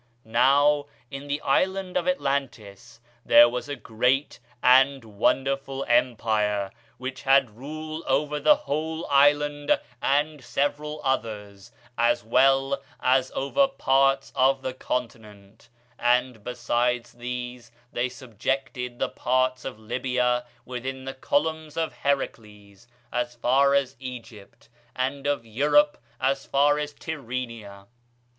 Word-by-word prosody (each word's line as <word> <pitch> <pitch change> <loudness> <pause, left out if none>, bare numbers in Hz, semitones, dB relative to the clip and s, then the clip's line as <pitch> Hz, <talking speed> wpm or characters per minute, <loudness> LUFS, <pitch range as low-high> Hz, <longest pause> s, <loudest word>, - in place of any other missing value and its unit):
Now, 140 +5 +3 0.2
in 140 +1 -7
the 145 +1 -1
island 190 +6 0
of - - 0
Atlantis 135 - -3 0.2
there 120 - +8
was 125 +4 -4
a 145 - -3
great 125 +4 0 0.2
and 135 +1 +5
wonderful 135 +5 -1
empire, 110 -5 +1 0.3
which 130 +1 -6
had 135 -5 +3
rule 155 +5 -7
over 150 +2 0
the 300 - +6
whole 160 - -3
island 145 +1 +3 0.2
and 145 0 0
several 145 +4 -2
others, 105 -6 -3 0.3
as 120 0 +2
well 135 +4 +3 0.2
as 130 +1 +2
over 275 - +2
parts 135 - +1
of 135 +1 +3
the 130 - -3
continent; 110 -5 -6 0.3
and, 125 -2 +1
besides 120 0 -1
these, 125 0 -6 0.2
they 120 +1 0
subjected 125 0 -4
the - - 0
parts 130 0 0
of 130 -4 -5
Libya 125 +2 -1 0.2
within 130 +1 -6
the 135 - -5
Columns 155 +3 -1
of 165 -1 -1
Heracles 105 -7 -4 0.3
as 120 0 -2
far 135 +4 +3
as 135 -1 0
Egypt, 120 -5 -10 0.3
and 135 +2 -2
of 145 -5 -1
Europe 150 - +3 0.2
as 135 +1 0
far 145 +1 +2
as 150 0 -3
Tyrrhenia. 115 -10 -6
130 Hz, 120 wpm, -25 LUFS, 120-140 Hz, 0.3 s, there